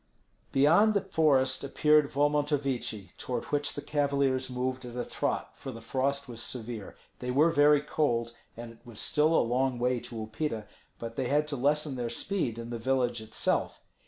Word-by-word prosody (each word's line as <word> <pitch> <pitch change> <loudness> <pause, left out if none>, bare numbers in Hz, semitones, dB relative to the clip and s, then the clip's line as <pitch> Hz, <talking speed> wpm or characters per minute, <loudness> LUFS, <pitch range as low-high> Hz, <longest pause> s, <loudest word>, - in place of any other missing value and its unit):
Beyond 170 +11 +5
the 200 - +3
forest 135 -6 +2
appeared 150 +1 +3
Volmontovichi, 145 -7 0
toward 125 -2 -3
which 145 0 0
the 145 - -5
cavaliers 140 -3 +1
moved 130 +1 -2
at 120 -1 -8
a 125 - -2
trot, - - -2
for 135 - -7
the 115 - -9
frost 135 +4 -1
was 120 -2 -7
severe; 115 -4 -5 0.2
they 125 - -4
were 150 +6 +4
very 145 -1 +5
cold, 120 -6 0 0.2
and 120 0 -7
it 115 - -17
was 120 -4 -9
still 150 +2 +2
a - - +4
long 125 +2 +1
way 125 +1 +1
to 120 - -10
Upita, 110 +1 -3 0.3
but 115 0 -7
they 125 - 0
had 150 +3 +2
to 145 - -2
lessen 145 +1 +1
their 120 -1 -2
speed 150 - -2
in 115 0 -6
the 120 - -4
village 125 -1 0
itself. 110 0 -1
130 Hz, 180 wpm, -29 LUFS, 120-145 Hz, 0.3 s, Beyond